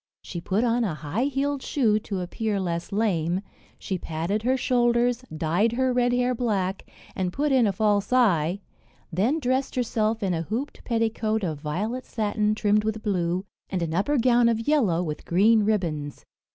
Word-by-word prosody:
She 175 - -6
put 195 +6 0
on 240 0 +2
a 185 -8 -1
high 160 - -2
heeled 280 0 -1
shoe 225 -8 +1
to 200 -3 -4
appear 205 +3 -2
less 170 0 -3
lame, 185 -4 0 0.4
she 190 -2 -4
padded 165 +7 -2
her 255 +3 +1
shoulders, 240 -1 +2
dyed 175 +9 +1
her 260 +1 +1
red 245 0 +2
hair 250 +1 +1
black, 200 -6 -2 0.3
and 185 -2 -1
put 290 +8 0
in 255 -4 +4
a - - +2
false 205 +1 +1
eye; 195 -7 +3 0.5
then 220 - +2
dressed 260 0 -1
herself 220 -3 0
in 190 -2 +1
a 165 - -1
hooped 230 - -4
petticoat 225 -2 0
of 155 -5 -2
violet 210 +12 -3
satin 210 -1 0
trimmed 210 0 +2
with 220 0 -3
blue, 180 -2 -1 0.2
and 185 -3 -1
an 160 -1 -3
upper 205 - +1
gown 240 -1 +4
of 225 -1 0
yellow 215 - +2
with 150 -3 -5
green 215 +6 +4
ribands. 170 -9 -2
215 Hz, 175 wpm, -25 LUFS, 180-245 Hz, 0.5 s, in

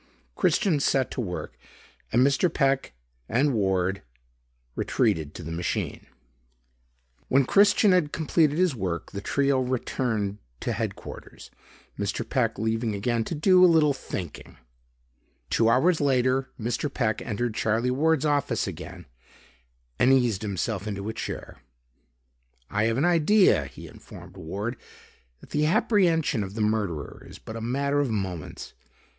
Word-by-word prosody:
Christian 170 -8 +2
set 135 -2 +1
to - - -3
work 90 -6 -5 0.6
and 125 +3 +4
Mr. 140 +5 +2
Peck 135 - +1 0.4
and 135 +5 +2
Ward 95 -3 0 0.7
retreated 75 -2 0
to 85 - -7
the 80 - -6
machine. 85 +1 -3 1.2
When 135 0 +3
Christian 200 - +5
had 175 -5 +2
completed 155 -1 +1
his 180 -3 +3
work, 90 -7 -4
the 100 - -5
trio 140 +4 +1
returned 115 -5 -2 0.2
to - - -2
headquarters, - - -7 0.5
Mr. - - -2
Peck - - 0
leaving 110 0 -1
again 115 +3 0
to - - -4
"do 185 +4 +5
a 180 - +8
little 155 -3 +4
thinking." 95 - -7 0.9
Two 115 0 +3
hours 155 +8 +3
later, 130 -1 +2
Mr. 120 +5 -2
Peck 110 -5 -1
entered 115 +1 -2
Charlie 115 +3 0
Ward's 155 +2 +2
office 145 -2 +1
again - - -8 0.9
and 130 - +5
eased 120 -7 +2
himself 105 0 -3
into 100 0 -4
a - - -3
chair. - - -6 1.1
"I 105 +1 +1
have 115 +1 +1
an 145 - +2
idea," 175 +4 +4
he - - -11
informed - - -13
Ward, 100 +9 -5 0.6
"that - - -16
the 150 +1 +1
apprehension 165 - +2
of 95 +1 -8
the 115 - -2
murderer 105 -8 -2
is - - -11
but 110 - -9
a 115 - -5
matter 140 +5 0
of 140 -3 +1
moments. 95 -7 -5
125 Hz, 140 wpm, -26 LUFS, 105-145 Hz, 1.2 s, a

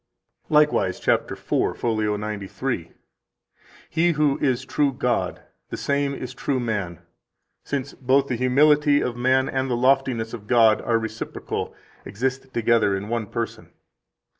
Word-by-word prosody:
10 - - -1
Likewise 150 0 +3
(cap. - - +1
4, - - -1
fol. 110 -3 0
93): 105 -1 -4 1.0
"He 170 +2 +2
who 150 -2 +1
is 130 -1 0
true 145 +1 +1
God, 125 -2 -1 0.3
the - - -5
same 140 0 0
is 130 -1 -6
true 130 +1 -1
man, 105 -8 -3 0.6
since 140 -1 -3
both 135 +2 +2
the 125 - -1
humility 145 +4 +4
of 125 - -2
man 130 +2 +2
and 130 0 -1
the 120 - 0
loftiness 130 -3 +1
of 105 -3 -8
God 115 -2 +5
are 115 - +1
reciprocal 110 0 -5 0.3
[exist 130 +5 -3
together 115 -4 +2
in 100 +2 -6
one 115 -2 -2
person]. 115 +2 -5
125 Hz, 140 wpm, -23 LUFS, 110-135 Hz, 1.0 s, God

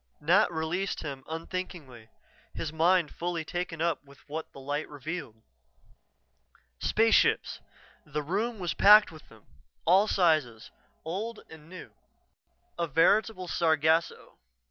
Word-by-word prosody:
Nat 175 +6 +3
released 170 +4 -2
him 140 -3 -7
unthinkingly, 160 -8 -7 0.5
his 155 -1 -4
mind 170 0 +2
fully 170 -2 -3
taken 175 -1 -4
up 170 -3 -1
with 140 -1 -18
what 160 +2 -6
the - - -12
light 145 +3 -4
revealed. 145 -6 -7 1.4
Spaceships! 225 +1 +2 0.4
The 150 -2 -4
room 215 +9 -2
was 180 -3 -3
packed 210 -1 +7
with 155 -1 -15
them 110 -2 -19 0.4
all 190 +5 +5
sizes, 155 - +1 0.3
old 210 +8 -5
and 160 0 -14
new. 185 0 -11 0.9
A 170 - 0
veritable 185 +5 +2
sargasso. 160 0 0
165 Hz, 120 wpm, -28 LUFS, 150-185 Hz, 1.4 s, packed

